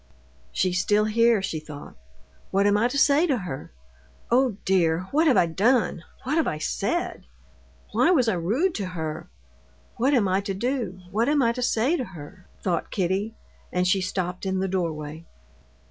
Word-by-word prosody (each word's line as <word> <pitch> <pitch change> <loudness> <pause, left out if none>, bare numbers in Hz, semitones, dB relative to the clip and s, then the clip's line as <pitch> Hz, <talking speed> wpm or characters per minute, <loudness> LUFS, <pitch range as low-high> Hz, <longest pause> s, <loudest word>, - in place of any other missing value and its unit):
"She's 180 -1 0
still 210 +1 +2
here," 230 -1 +3
she 165 -4 -2
thought. 150 -2 -10 0.5
"What 200 +1 +2
am 205 0 +4
I 220 +3 +3
to 250 - -3
say 285 +5 +4
to 275 -5 +1
her? 175 - -6 0.6
Oh, 245 -4 +3
dear! 170 -3 +2
what 315 +3 +3
have 270 - +4
I - - +5
done, 210 +4 +1 0.2
what 285 +5 -1
have 325 - +2
I 155 - -1
said? 205 - -2 0.6
Why - - +3
was 275 -10 +4
I 225 - +3
rude 225 - 0
to 200 -3 -3
her? 160 -4 -5 0.7
What 270 +4 +3
am 215 -6 +3
I 190 +1 +1
to 195 -1 -4
do? 235 -4 -2
What 225 +7 +1
am 290 -2 +3
I 230 - +3
to 250 - -4
say 250 +7 +2
to 260 - -2
her?" 185 -2 -11 0.2
thought 175 -3 -1
Kitty, 195 +4 -1 0.4
and 180 0 +1
she 190 +1 +2
stopped 180 -1 -3
in 190 0 0
the 190 +1 0
doorway. 160 -4 -3
200 Hz, 180 wpm, -25 LUFS, 180-245 Hz, 0.7 s, I